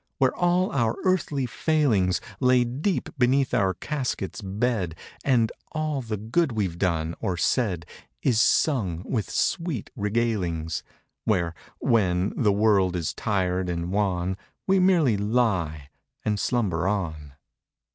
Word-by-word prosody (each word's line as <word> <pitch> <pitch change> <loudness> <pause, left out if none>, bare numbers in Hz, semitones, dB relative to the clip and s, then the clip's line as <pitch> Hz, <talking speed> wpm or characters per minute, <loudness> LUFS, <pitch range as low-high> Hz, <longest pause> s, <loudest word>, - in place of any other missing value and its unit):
Where 130 -2 +3
all 180 +1 +2
our 115 -4 +1
earthly 155 -7 +1
failings 120 - +1 0.2
Lay 125 -1 +4
deep 140 +11 -1
beneath 130 +1 +3
our 95 -6 +2
casket's 130 - -3
bed; 100 -3 -1 0.3
And 120 -5 +3 0.2
all 155 -3 -1
the 110 -3 -4
good 120 - 0
we've 95 -6 -2
done 85 -3 0
or 95 -5 -2
said 90 -5 0 0.4
Is 115 -4 +3
sung 95 - +2
with 110 -5 -2
sweet 165 - -1
regalings. 100 -8 -1 0.4
Where, 85 -6 +1 0.2
when, 95 -4 +1
the 105 -5 +3
world 100 -3 +3
is 85 -3 -2
tired 95 -3 -1
and 85 0 -2
wan 95 -2 0 0.3
We 195 0 +3
merely 170 - +4
lie 95 - 0 0.3
and 105 -1 0
slumber 95 -9 0
on. 80 -8 -3
105 Hz, 125 wpm, -25 LUFS, 90-125 Hz, 0.4 s, Lay